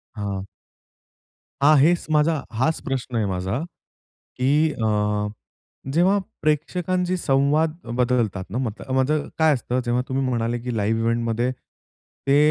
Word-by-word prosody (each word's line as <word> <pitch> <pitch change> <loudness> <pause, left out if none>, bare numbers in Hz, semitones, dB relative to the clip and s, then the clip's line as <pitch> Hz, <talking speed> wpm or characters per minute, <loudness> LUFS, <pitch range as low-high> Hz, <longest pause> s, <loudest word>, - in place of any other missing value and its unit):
हां. 100 -2 -3 1.2
हां 150 +2 +6
हेच 170 +4 +3
माझा, 155 +2 +3 0.2
हाच 160 +5 +2
प्रश्न 130 -2 -3
आहे 110 - +1
माझा 95 +5 -2 0.8
की 125 - 0 0.3
अ, 105 -2 0 0.7
जेव्हा 190 +4 +4 0.2
प्रेक्षकांशी 180 +4 0
संवाद 150 +2 +2 0.3
बदलतात 115 -7 +1
ना, 120 - -2
मतं 130 +1 -4
माझ 130 +2 +2 0.3
काय 160 -1 +5
असतं 125 0 -1
जेव्हा 120 +1 +1
तुम्ही 135 +1 -1
म्हणाले 120 -1 -1
की 125 0 -4
लाइव्ह 110 +2 +1
इव्हेंटमध्ये 115 +1 0 0.8
ते 140 +1 +5
125 Hz, 125 wpm, -23 LUFS, 115-150 Hz, 1.2 s, हां